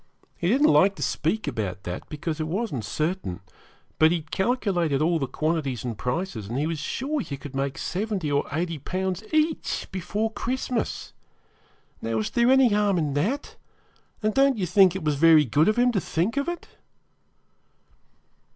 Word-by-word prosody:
He 170 - -2
didn't 280 - +4
like 195 +1 +5
to - - -4
speak 175 +5 -1
about 100 -8 -3
that, 90 0 -6
because 155 +1 -4
it 155 - -2
wasn't 180 - -2
certain; 155 - -2 0.6
but 155 - +7
he 175 - +1
had 155 - -22
calculated 190 - +1
all 165 +2 +2
the 135 - -1
quantities 155 -6 -1
and 120 -2 -3
prices, 125 - -3
and 120 +4 -3
he 145 - 0
was 160 -1 -2
sure 275 - -2
you 140 -10 -5
would 145 -2 -8
make 135 0 -2
70 190 -5 -2
or 145 0 +1
80 165 0 -2
Pounds 185 +5 -3
each 310 0 0
before 205 +4 -2
Christmas. 250 +1 -3 0.9
Now, 115 0 -2
was 110 -1 -1
there 235 +1 +3
any 265 -2 +6
harm 205 -2 +2
in 150 -4 0
that; 210 - -2 0.7
and 215 0 +1
don't 275 0 +4
you 190 - 0
think 185 +1 +5
it 190 - -4
was 150 -2 0
very 160 0 +6
good 145 +6 +3
of 215 - +2
him 245 0 +4
to 200 -5 0
think 180 +9 -1
of 280 +4 0
it?' 345 - -6
175 Hz, 180 wpm, -25 LUFS, 145-215 Hz, 0.9 s, but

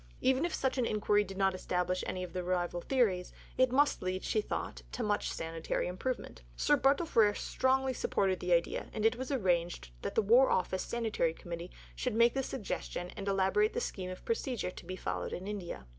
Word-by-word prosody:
Even 265 +4 +3
if 345 - -2
such 265 0 0
an 245 - +2
inquiry 210 -1 +2
did 195 -1 -8
not 195 -1 +3
establish 180 0 -1
any 185 - -3
of 175 -2 -7
the 180 -1 -2
rival 175 -1 -1
theories, 200 -7 +1 0.2
it 255 -1 +4
must 285 +3 +3
lead, 185 +1 -2
she 215 - +1
thought, - - -4
to - - -3
much 205 -1 0
sanitary 165 0 -2
improvement. 185 - -4
Sir 295 - +4
Bartle 280 +4 +3
Frere 215 -9 +4
strongly 265 0 +1
supported 190 -5 0
the 180 - -3
idea, 170 -1 +1
and 215 -1 -1
it 225 +2 +4
was 255 +1 -5
arranged 175 - 0
that - - -4
the 225 - +3
War 240 +6 +6
Office 185 +1 +1
Sanitary 220 -8 -1
Committee 170 0 -6 0.3
should 250 -4 -2
make 235 +1 +5
the 270 - 0
suggestion 200 -7 -4
and 200 - -6
elaborate 195 +2 +2
the - - 0
scheme 185 -2 -4
of 185 - -8
procedure 260 - -1
to - - -11
be 185 - -4
followed - - -3
in 185 - -5
India. 195 - -5
200 Hz, 205 wpm, -32 LUFS, 180-250 Hz, 0.3 s, War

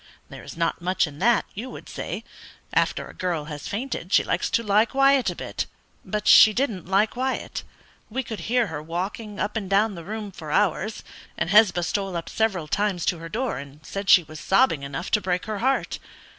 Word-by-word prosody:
There - - -9
is - - -10
not 165 +1 0
much 185 +1 +1
in 150 -1 -10
that, 240 0 +3
you 230 +6 -6
would - - -10
say; - - -5 0.5
after - - +1
a - - -12
girl 170 -5 -2
has 150 -2 -7
fainted 210 -4 -4
she - - +5
likes - - -1
to 230 - +1
lie 210 +1 +4
quiet 275 +1 +3
a - - -4
bit; - - -4 0.4
but 210 -1 -3
she 215 - +9
didn't 215 - -1
lie 195 +2 +4
quiet. 255 +4 -3 0.5
We 260 +4 -2
could 225 -2 -6
hear 245 0 +3
her 160 -6 -5
walking 190 +6 -5
up 210 - -2
and 205 -4 -3
down 205 +2 +3
the 170 -3 -8
room 210 +2 -5
for 160 -4 -9
hours, 205 +5 0 0.3
and 175 - -1
Hesba 200 -4 +5
stole 195 +1 -2
up 165 - -6
several 195 -8 0
times 200 0 0
to 175 - 0
her 165 0 -8
door 240 +5 -2
and 140 +2 -12
said 195 +3 -5
she 180 - +8
was 155 0 -10
sobbing 195 - +3
enough 140 +5 -5
to 210 - +3
break 180 -1 -1
her 215 -2 -3
heart. 265 +4 0
200 Hz, 210 wpm, -24 LUFS, 170-220 Hz, 0.5 s, she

